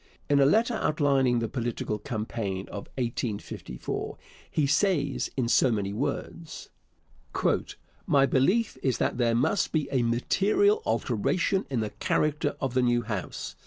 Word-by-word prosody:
In 140 Hz, -, +5 dB
a 135 Hz, -, +6 dB
letter 225 Hz, -, +3 dB
outlining 140 Hz, -, +2 dB
the 115 Hz, -1 st, 0 dB
political 115 Hz, -3 st, -3 dB
campaign 105 Hz, -4 st, -3 dB
of 100 Hz, -, -7 dB
1854, 115 Hz, -, -4 dB, 0.3 s
he 150 Hz, -, +1 dB
says 145 Hz, -1 st, +1 dB
in 125 Hz, -3 st, +1 dB
so 125 Hz, +1 st, +4 dB
many 100 Hz, -3 st, -1 dB
words: 155 Hz, +6 st, -4 dB, 1.4 s
My 140 Hz, -1 st, +5 dB
belief 180 Hz, -, +2 dB
is 130 Hz, -4 st, +1 dB
that -, -, -1 dB
there 115 Hz, -1 st, +2 dB
must 130 Hz, +11 st, +1 dB
be 155 Hz, -3 st, 0 dB
a 130 Hz, -3 st, +2 dB
material 205 Hz, -, +2 dB
alteration 190 Hz, +2 st, 0 dB
in 130 Hz, -4 st, 0 dB
the 110 Hz, -, -3 dB
character 150 Hz, 0 st, 0 dB
of 135 Hz, -3 st, -2 dB
the 130 Hz, -, +3 dB
new 120 Hz, -1 st, +2 dB
House. 105 Hz, -4 st, -5 dB
130 Hz, 140 wpm, -27 LUFS, 115-150 Hz, 1.4 s, a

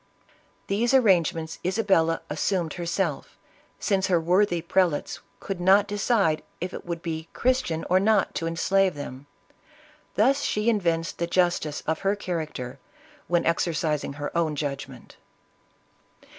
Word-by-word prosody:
These 235 Hz, +6 st, +1 dB
arrangements 170 Hz, -, +2 dB
Isabella 185 Hz, -4 st, +2 dB
assumed 165 Hz, +1 st, -1 dB
herself, 170 Hz, -2 st, -3 dB, 0.4 s
since 190 Hz, -1 st, +1 dB
her 180 Hz, -3 st, +3 dB
worthy 175 Hz, +2 st, +2 dB
prelates 175 Hz, -3 st, 0 dB, 0.2 s
could 195 Hz, -3 st, -5 dB
not 195 Hz, +3 st, +5 dB
decide 200 Hz, -5 st, +1 dB, 0.2 s
if 180 Hz, +1 st, -4 dB
it -, -, -8 dB
would 170 Hz, -1 st, -4 dB
be 160 Hz, -1 st, -4 dB
Christian 250 Hz, -11 st, 0 dB
or 185 Hz, +1 st, +4 dB
not 205 Hz, -1 st, +2 dB
to 165 Hz, -, -2 dB
enslave 185 Hz, +2 st, +2 dB
them; 145 Hz, -1 st, -8 dB, 0.9 s
thus 270 Hz, +6 st, +3 dB
she 210 Hz, -1 st, +1 dB
evinced 170 Hz, -6 st, -1 dB
the 170 Hz, -, 0 dB
justice 175 Hz, -4 st, 0 dB
of 160 Hz, 0 st, -1 dB
her 195 Hz, +1 st, +1 dB
character, 155 Hz, -10 st, -5 dB, 0.5 s
when 175 Hz, -1 st, +1 dB
ex 165 Hz, -, +2 dB
ercising 155 Hz, -4 st, -1 dB
her 145 Hz, +2 st, -5 dB
own 165 Hz, -3 st, +1 dB
judgment. 140 Hz, -3 st, -6 dB
175 Hz, 130 wpm, -25 LUFS, 160-195 Hz, 0.9 s, not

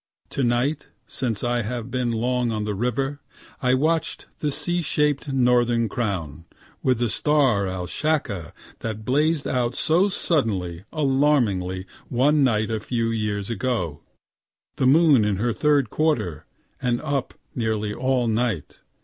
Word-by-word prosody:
To -, -, -2 dB
night, 125 Hz, +5 st, 0 dB, 0.2 s
since, 115 Hz, -5 st, -3 dB
I 120 Hz, 0 st, +1 dB
have 120 Hz, +2 st, -4 dB
been 125 Hz, -2 st, 0 dB
long 120 Hz, +1 st, 0 dB
on 105 Hz, -1 st, -2 dB
the 105 Hz, 0 st, -2 dB
river. 130 Hz, +6 st, -2 dB, 0.4 s
I 125 Hz, -1 st, +3 dB
watch 160 Hz, +4 st, +1 dB, 0.2 s
the 150 Hz, -, 0 dB
C 175 Hz, +5 st, -1 dB
shaped 150 Hz, -2 st, 0 dB
Northern 120 Hz, -2 st, +3 dB
Crown, 90 Hz, -9 st, -3 dB, 0.4 s
(with 130 Hz, -2 st, +2 dB
the 120 Hz, +1 st, +1 dB
star 120 Hz, -4 st, +2 dB
Alshacca 95 Hz, -, -2 dB, 0.3 s
that 110 Hz, -1 st, -5 dB
blazed 150 Hz, +4 st, +1 dB
out 125 Hz, -1 st, 0 dB
so 175 Hz, +6 st, +3 dB
suddenly, 100 Hz, -, -1 dB
alarmingly, 130 Hz, -, +1 dB, 0.2 s
one 145 Hz, +4 st, +3 dB
night 110 Hz, -3 st, +2 dB
a 110 Hz, -, -1 dB
few 115 Hz, +1 st, -1 dB
years 105 Hz, -2 st, -2 dB
ago.) 110 Hz, -, -2 dB, 0.8 s
The 130 Hz, -, +2 dB
moon 145 Hz, -4 st, +6 dB
in 105 Hz, -1 st, +1 dB
her 115 Hz, +4 st, 0 dB
third 145 Hz, +3 st, +2 dB
quarter, 105 Hz, -, 0 dB, 0.3 s
and 120 Hz, -2 st, +1 dB
up 140 Hz, -4 st, -2 dB, 0.2 s
nearly 110 Hz, -3 st, -1 dB
all 130 Hz, +1 st, +1 dB
night. 110 Hz, -, -1 dB
120 Hz, 140 wpm, -24 LUFS, 105-140 Hz, 0.8 s, moon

